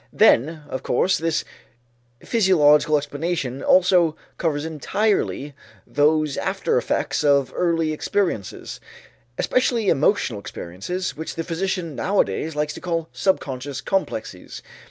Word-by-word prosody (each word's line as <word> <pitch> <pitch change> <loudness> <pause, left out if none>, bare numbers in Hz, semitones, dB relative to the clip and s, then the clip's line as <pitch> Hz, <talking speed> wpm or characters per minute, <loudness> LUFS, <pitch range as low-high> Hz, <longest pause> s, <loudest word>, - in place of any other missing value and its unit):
Then, 155 +5 +3
of 130 - -5
course, 185 +9 +1
this 165 -1 -1 0.8
physiological 155 -8 +4
explanation 145 -2 -3
also 180 -3 +4 0.2
covers 150 -3 -1
entirely 160 -2 -1 0.3
those 150 0 +2
after - - -1
effects - - -1
of 140 -3 +3
earlier 165 -3 +1
experiences, 170 - -2 0.6
especially 235 -5 +1
emotional 145 - +2
experiences, 100 - -5
which 160 +1 -6
the 165 - -3
physician 175 -1 -2
nowadays 155 - 0
likes 150 0 -1
to - - -9
call 165 -3 -2
subconscious 135 -7 -1
"complexes." 110 - -3
155 Hz, 110 wpm, -22 LUFS, 145-180 Hz, 0.8 s, physiological